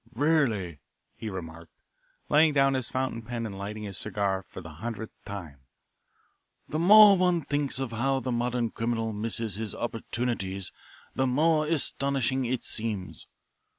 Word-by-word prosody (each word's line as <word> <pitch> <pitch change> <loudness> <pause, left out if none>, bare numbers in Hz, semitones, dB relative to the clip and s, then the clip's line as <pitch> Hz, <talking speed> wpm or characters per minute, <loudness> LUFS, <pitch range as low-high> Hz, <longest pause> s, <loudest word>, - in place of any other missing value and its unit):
"Really," 115 - +1 0.4
he 110 - -5
remarked, 85 -3 -8 0.6
laying 155 +1 +5
down 135 -1 +4
his 130 -3 -2
fountain 130 -3 -2
pen 115 0 -4
and 100 -3 -5
lighting 105 +2 -5
his 100 -3 -5
cigar 100 -2 -1
for - - -11
the 80 -2 -10
hundredth 110 -2 -5
time, 85 -9 -7 1.1
"the 155 - -2
more 205 +3 +9
one 180 -2 +2
thinks 145 -2 -1
of 135 -3 -3
how 135 +4 +1
the 130 -1 -3
modern 120 -1 0
criminal 115 -1 -1
misses 110 0 -3
his 110 +2 -5
opportunities 115 -5 -3 0.4
the 130 - +1
more 155 +4 +3
astonishing 135 -4 0
it 125 +1 -1
seems. 105 -5 -3
120 Hz, 145 wpm, -28 LUFS, 105-135 Hz, 1.1 s, more